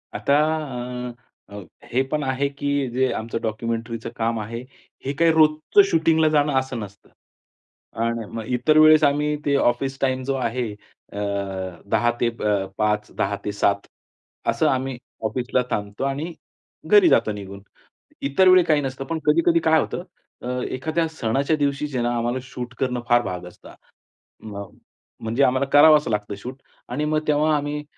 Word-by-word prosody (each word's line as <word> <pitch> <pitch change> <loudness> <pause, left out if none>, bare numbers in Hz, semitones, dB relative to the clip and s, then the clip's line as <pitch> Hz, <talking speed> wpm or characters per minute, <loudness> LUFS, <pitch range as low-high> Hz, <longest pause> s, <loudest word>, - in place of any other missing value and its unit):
आता 140 - +2 0.7
अ, - - -9 0.4
अ, 100 0 -8 0.3
हे 130 - +3
पण 150 -1 0
आहे, 135 +1 0
की 140 -1 -1
जे 130 +1 +1
आमचं 115 +1 -4
डॉक्युमेंटरीचं 115 +1 -3
काम 115 0 -1
आहे, 115 +2 -5 0.5
हे 135 - -1
काही 165 0 +5
रोजचं 155 +4 +4
शूटिंगला 160 -1 +3
जाणं 150 -1 +2
असं 130 -2 -5
नसतं 100 -1 -10 0.9
आणि 115 -1 -1
मग 115 - -4
इतर 130 +5 +2
वेळेस 155 0 +7
आम्ही 150 +1 +2
ते 140 -1 +2
ऑफिस 135 +1 0
टाईम 130 -1 0
जो 135 +1 -1
आहे 120 -2 -2 0.4
अ, - - -7 0.7
10 120 +3 +2
ते 120 - +3
अ, 105 -4 -1
5, 105 0 0
10 100 +1 0
ते 105 - -1
7 100 0 0 0.6
असं - - +2
आम्ही 130 -1 -1 0.3
ऑफिसला 125 +3 0
थांबतो 105 +3 -3
आणि 145 +5 -3 0.5
घरी 410 -5 +6
जातो 110 - +3
निघून. 100 -1 -8 0.6
इतर 140 +7 +3
वेळी 185 -1 +7
काही 150 -3 +2
नसतं 135 0 -4
पण 165 +1 -3
कधी-कधी 165 +2 +4
काय 160 -1 +3
होतं, - - -4 0.4
अ, - - -6 0.3
एखाद्या 160 +5 -1
सणाच्या 140 0 0
दिवशी 145 0 0
जे 140 -3 -5
आहे 120 - 0
ना 120 - 0
आम्हाला 120 +2 -1
शूट 125 -1 -7
करणं 125 -2 -1
फार 120 0 +5
भाग 90 -2 -5
असतं. 90 - -14 0.7
मग 100 -2 -8 0.5
म्हणजे 115 +5 +1
आम्हाला 130 +1 +2
करावंच 150 0 +7
लागतं 105 -1 -2
शूट 130 +6 -9 0.3
आणि 150 +5 -1
मग 155 0 +1
तेव्हा 150 +1 +3
आम्ही 145 +1 -3
130 Hz, 165 wpm, -23 LUFS, 115-150 Hz, 0.9 s, वेळेस